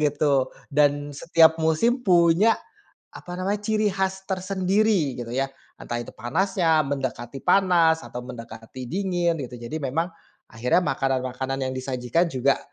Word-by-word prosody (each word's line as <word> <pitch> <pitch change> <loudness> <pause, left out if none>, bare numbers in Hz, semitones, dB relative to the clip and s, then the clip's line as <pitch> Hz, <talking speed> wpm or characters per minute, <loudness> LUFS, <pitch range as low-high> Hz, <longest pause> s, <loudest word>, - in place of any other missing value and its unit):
gitu. 145 -2 +2 0.2
Dan 145 0 +2
setiap 160 +2 +4
musim 160 +11 +2
punya, 180 +1 +4 0.6
apa 175 - -10
namanya, 200 +3 -1
ciri 215 0 +1
khas 190 0 -2
tersendiri 190 - +1
gitu 120 0 -6
ya. 135 0 0 0.3
Entah 120 0 -4
itu 120 - -8
panasnya, 165 - +1
mendekati 135 -2 -4
panas, 170 -4 +4
atau 125 0 -7
mendekati 115 0 -9
dingin, 175 0 0
gitu. 125 -1 -9
Jadi 120 +6 -5
memang 155 +6 -1 0.4
akhirnya 125 +10 +1
makanan-makanan 135 -1 -1
yang 130 - -2
disajikan 130 +5 0
juga 135 -1 +1
155 Hz, 130 wpm, -24 LUFS, 130-185 Hz, 0.6 s, setiap